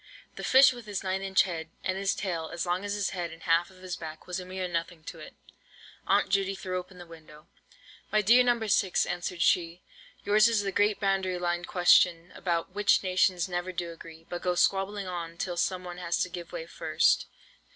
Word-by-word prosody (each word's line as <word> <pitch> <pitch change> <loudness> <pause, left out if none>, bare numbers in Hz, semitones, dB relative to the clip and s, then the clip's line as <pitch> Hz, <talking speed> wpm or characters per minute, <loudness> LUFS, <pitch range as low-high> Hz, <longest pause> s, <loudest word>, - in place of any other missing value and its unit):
The - - -8
fish 265 0 +6
with 240 -3 -11
his 200 -3 -4
nine 190 0 -1
inch 195 -1 +3
head, 165 -4 -5
and 185 - -1
his 195 0 0
tail 170 -5 -3
as 170 +1 -3
long 180 +2 -1
as 205 0 -2
his 205 -2 -1
head 175 -3 -4
and 165 0 -12
half 170 +1 +2
of 185 -1 -18
his 180 -1 -4
back, 155 -1 -9
was 180 +1 -4
a 180 - -8
mere 185 0 -4
nothing 170 -1 -4
to - - -9
it. - - -11 0.7
Aunt - - +3
Judy 195 0 +1
threw 185 -1 -3
open 180 0 -12
the 175 - -10
window. 155 -2 -15 0.7
"My 215 0 +2
dear 240 +5 +6
No. 240 -2 +1
6," 200 -3 +2
answered 175 -1 -3
she, 170 0 +1 0.4
"yours 215 +2 +5
is 225 -3 +1
the 195 - -2
great 205 +2 +2
boundary 195 -2 0
line 175 0 -2
question 175 -1 +4
about 170 0 -2
which 205 0 +3
nations 185 -1 +2
never 175 0 -3
do 175 -1 -4
agree, 165 -1 -12
but 175 - -5
go 180 -1 0
squabbling 195 +2 +1
on 170 -2 -6
till 180 -1 -3
some 180 +1 -1
one 180 0 -8
has 170 -1 -1
to 180 - -5
give 175 0 -8
way - - -5
first. - - +1
180 Hz, 215 wpm, -28 LUFS, 175-195 Hz, 0.7 s, fish